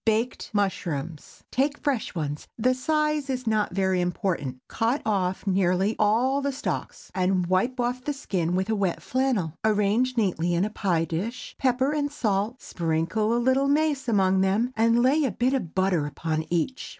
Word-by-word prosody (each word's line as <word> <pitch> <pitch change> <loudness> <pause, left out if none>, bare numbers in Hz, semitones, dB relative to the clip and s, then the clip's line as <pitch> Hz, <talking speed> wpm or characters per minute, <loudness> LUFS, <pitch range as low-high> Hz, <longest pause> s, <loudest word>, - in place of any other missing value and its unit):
BAKED 225 +2 0
MUSHROOMS. 170 -6 -3
Take 280 +3 +1
fresh 270 -10 -2
ones,—the 160 - -1
size 300 +1 0
is 255 -1 -2
not 215 -2 +1
very 190 -2 +2
important,—cut 180 - -2
off 190 -3 0
nearly 190 +1 +2
all 245 +7 +2
the 280 0 0
stalks, 265 - -5
and 185 -1 +1
wipe 190 +9 0
off 245 +1 -1
the 295 - -1
skin 180 - -2
with 190 +4 0
wet 200 -5 -1
flannel. 250 - 0
Arrange 220 +4 +2
neatly 175 -5 +1
in 175 +3 +2
a 215 - -4
pie 175 -6 0
dish, 195 +10 -4
pepper 260 +1 +2
and 290 -1 -1
salt, 215 -1 -1
sprinkle 170 +6 -1
a 235 - +2
little 260 +3 +2
mace 290 -2 +1
among 190 -4 +3
them, 210 +7 +1
and 230 +2 +3
lay 285 +5 +4
a 270 - +2
bit 245 +6 0
of 210 - -3
butter 185 -5 +1
upon 155 +2 -3
each. 175 +10 -1
215 Hz, 160 wpm, -26 LUFS, 180-255 Hz, -, lay